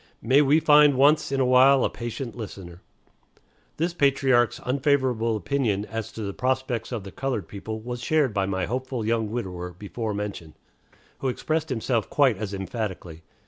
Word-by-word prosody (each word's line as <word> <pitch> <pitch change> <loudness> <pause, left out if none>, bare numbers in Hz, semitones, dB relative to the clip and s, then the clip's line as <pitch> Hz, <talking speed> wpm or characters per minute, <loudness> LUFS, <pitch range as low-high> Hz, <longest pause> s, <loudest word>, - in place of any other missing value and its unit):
May 130 +6 +5
we 150 +2 +4
find 150 -2 +6
once 145 +2 +4
in 135 - 0
a 130 - +3
while 130 +1 +5
a - - +1
patient 120 +1 -6
listener. 95 -6 -9 1.0
This 170 +2 -1
patriarch's 135 -6 +2
unfavorable 130 -4 +1
opinion 110 -4 -1
as 115 -1 -5
to 110 - -6
the 100 -1 -4
prospects 130 -1 -2
of 115 -5 -4
the 95 - -9
colored 125 -9 -3
people 110 +2 -6
was 120 +1 -6
shared 150 -4 +1
by 100 -2 0
my 95 -1 -1
hopeful 130 -2 -3
young 110 -1 0
widower 90 -6 -5
before 105 +4 -5
mentioned, 100 -6 -6 0.6
who 135 - -2
expressed 155 +5 -2
himself 115 -3 -1
quite 135 -6 +3
as 105 -1 -4
emphatically. 95 -4 -5
120 Hz, 165 wpm, -25 LUFS, 105-135 Hz, 1.0 s, find